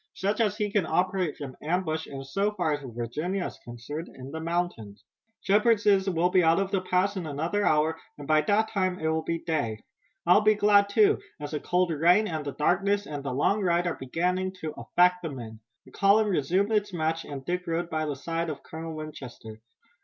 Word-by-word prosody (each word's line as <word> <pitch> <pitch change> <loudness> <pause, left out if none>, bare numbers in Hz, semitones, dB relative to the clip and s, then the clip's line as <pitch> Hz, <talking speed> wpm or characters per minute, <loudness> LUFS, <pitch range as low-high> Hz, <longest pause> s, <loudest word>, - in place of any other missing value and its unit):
"Such 205 +4 0
as 210 -2 +1
he 210 -2 -1
can 200 -6 +1
operate 180 0 0
only 135 -3 -6
from - - -21
ambush, 160 -1 -1
and 135 -1 -7
so 200 +10 0
far 160 -7 0
as 145 - -3
Virginia 135 - -3
is - - -7
concerned, 120 +8 -7
in 130 +1 -10
the 160 - -5
mountains. 165 -11 -3 0.4
Shepard 210 +3 +3
says 200 -2 +3
we'll 175 0 +1
be 185 -1 +4
out 165 +2 +4
of 195 0 -1
the 195 - +1
pass 185 +2 +1
in 180 -4 -4
another 165 +8 -1
hour, 155 -1 +2 0.2
and 145 -1 -9
by 155 0 +4
that 215 +5 +1
time 185 -3 0
it 160 - -2
will 160 0 +1
be 165 +1 -3
day. 115 -9 -2 0.4
I'll 180 +4 +6
be 215 0 +4
glad, 205 -1 +4
too, 210 0 +4 0.2
as 145 -1 -6
the 150 - -2
cold 180 +1 +1
rain 175 +7 +4
and 155 -4 -3
the 140 -1 -5
darkness 200 +6 +1
and 145 -2 -6
the 135 - -3
long 195 +11 +1
ride 175 -2 +2
are 175 - 0
beginning 180 +7 -1
to 155 - -3
affect 180 +4 +2
the 165 - -4
men." 115 -5 -8 0.3
The - - -16
column 205 +2 +3
resumed 185 +5 +1
its 210 -1 +1
march, 165 -1 -1 0.2
Dick 180 +2 -2
rode 170 +1 -2
by 155 -1 -1
the 145 - -2
side 165 +4 -3
of 145 -3 -6
Colonel 160 0 -7
Winchester. 125 -8 -9
170 Hz, 215 wpm, -27 LUFS, 150-195 Hz, 0.4 s, I'll